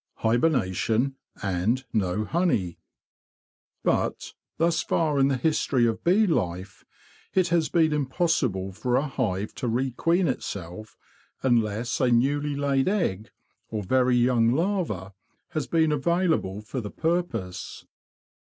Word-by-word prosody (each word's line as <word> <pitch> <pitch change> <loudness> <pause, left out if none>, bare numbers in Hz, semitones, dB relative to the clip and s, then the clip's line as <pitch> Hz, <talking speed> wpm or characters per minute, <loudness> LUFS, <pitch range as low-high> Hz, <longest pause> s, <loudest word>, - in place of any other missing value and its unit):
Hibernation, 120 - +1 0.3
and 105 +7 0
no 105 -1 0
Honey 135 - 0 1.0
But, - - -1 0.2
thus 165 0 +2
far 150 -4 0
in 135 - +5
the 135 -2 +1
history 130 -3 +1
of 115 -1 -1
bee 195 +6 +4
life, 95 - -2 0.5
it 185 -2 +3
has 170 -2 +2
been 160 -3 +3
impossible 130 - 0
for 125 +6 -1
a 140 - +2
hive 110 -8 -2
to 130 -1 -4
re 125 +3 0
queen 170 +8 +1
itself 100 - -5 0.5
unless 115 -2 +1
a 130 - +3
newly 140 +4 +1
laid 140 -1 +1
egg, 115 - -1 0.4
or 110 -2 -3
very 125 +4 +2
young 120 -1 +3
larva, 155 - -1 0.4
has 155 -7 -3
been 160 +2 +2
available 155 - 0
for 125 +4 -4
the 105 - -6
purpose. 160 - -3
130 Hz, 125 wpm, -26 LUFS, 105-160 Hz, 1.0 s, in